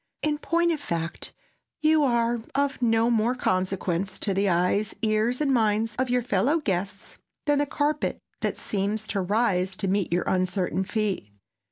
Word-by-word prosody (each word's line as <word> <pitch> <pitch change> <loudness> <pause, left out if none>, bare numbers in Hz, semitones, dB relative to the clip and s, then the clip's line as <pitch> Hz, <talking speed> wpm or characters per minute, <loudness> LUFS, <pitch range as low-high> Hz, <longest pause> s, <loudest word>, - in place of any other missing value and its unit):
In 300 -1 +1
point 340 +2 +2
of 315 - -1
fact, 170 - -3 0.5
you 310 0 +4
are 235 -2 +2 0.2
of 280 -1 0
no 230 0 +3
more 235 +2 +2
consequence 185 -3 -1
to 200 - +1
the 195 +1 +2
eyes, 180 +4 +1
ears 220 +3 +1
and 285 -3 +2
minds 220 -1 +2
of 260 -1 +1
your 250 0 +2
fellow 250 - +2
guests 195 - -3 0.3
than 290 -1 +3
the 290 - +1
carpet 295 +2 0 0.2
that - - -1
seems 210 +2 -2
to 200 - 0
rise 190 -2 +1
to 195 - -1
meet 195 -2 0
your 175 +1 +1
uncertain 185 0 0
feet. 200 - -2
215 Hz, 165 wpm, -26 LUFS, 190-255 Hz, 0.5 s, you